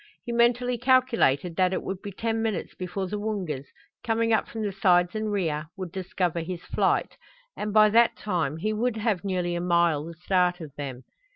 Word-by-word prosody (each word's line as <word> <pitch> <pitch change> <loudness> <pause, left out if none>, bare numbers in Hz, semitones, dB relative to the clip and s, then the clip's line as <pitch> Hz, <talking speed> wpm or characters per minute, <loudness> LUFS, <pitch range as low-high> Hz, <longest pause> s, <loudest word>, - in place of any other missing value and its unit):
He 240 - -4
mentally 240 +1 +2
calculated 235 - +3
that 185 0 +3
it - - -2
would 190 0 -5
be 205 - -6
ten 225 +3 -2
minutes 220 -6 -2
before 185 +1 -4
the 205 +3 -4
Woongas, 185 -11 -3 0.4
coming 230 -1 +1
up 220 - +2
from 225 -1 -5
the 205 - -1
sides 180 -2 +3
and 215 -1 -2
rear, 160 -6 -1
would 185 -3 -5
discover 180 -2 -2
his 170 +1 -5
flight, - - 0 0.4
and 210 0 -3
by 215 0 +6
that 235 +1 +4
time 165 -8 -1
he 215 +6 -1
would 225 +1 0
have 215 -4 0
nearly 180 -3 -1
a 175 - -2
mile 170 -4 +2
the 165 +1 -8
start 180 +1 +1
of 155 -5 -9
them. 130 -3 -6
190 Hz, 195 wpm, -26 LUFS, 175-220 Hz, 0.4 s, by